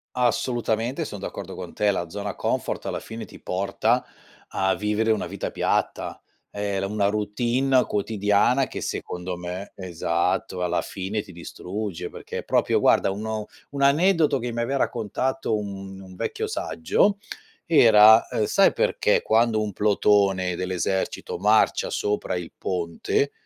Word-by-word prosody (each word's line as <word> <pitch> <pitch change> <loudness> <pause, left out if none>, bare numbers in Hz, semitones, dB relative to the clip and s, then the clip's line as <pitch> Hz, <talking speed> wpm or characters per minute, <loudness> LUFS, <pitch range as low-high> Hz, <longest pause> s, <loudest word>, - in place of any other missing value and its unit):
Assolutamente 120 +3 0
son 105 - -7
d'accordo 95 -1 -6
con 90 -2 -8
te. 105 -1 +1
La 90 -3 -1
zona 100 +3 -5
comfort - - -2
alla - - -2
fine 115 -1 -8
ti - - -14
porta 100 +2 0 0.4
a 95 0 +1
vivere 105 +3 0
una 105 -4 0
vita 100 +2 -4
piatta, - - -1 0.3
ehm, 100 -1 -2
la - - -1
una 100 0 0
routine 120 +5 +1
quotidiana 105 +5 +2
che - - -6
secondo 90 0 -4
me 90 +3 -6
esatto, 90 0 -1
alla 90 0 0
fine 100 +3 -4
ti 95 - -13
distrugge 90 +1 -6
perché - - -6
è - - -6
proprio - - +2
guarda - - +4
uno 110 +1 -4 0.2
un 140 -1 -4
aneddoto 155 +1 +4
che 120 -1 -4
mi 120 0 -2
aveva 135 +4 -1
raccontato 115 +1 -1
un 95 -2 -7
un 95 -1 -12
vecchio - - -3
saggio 200 - +1 0.5
era, 110 -8 +7
ehm: 105 - 0
"Sai - - +4
perché - - +1
quando 110 0 +3
un 105 -2 -4
plotone 100 -3 +2
dell'esercito 90 +1 -2
marcia - - +3
sopra 105 -3 -1
il 90 -2 -5
ponte 90 +10 -1
105 Hz, 145 wpm, -24 LUFS, 95-115 Hz, 0.5 s, era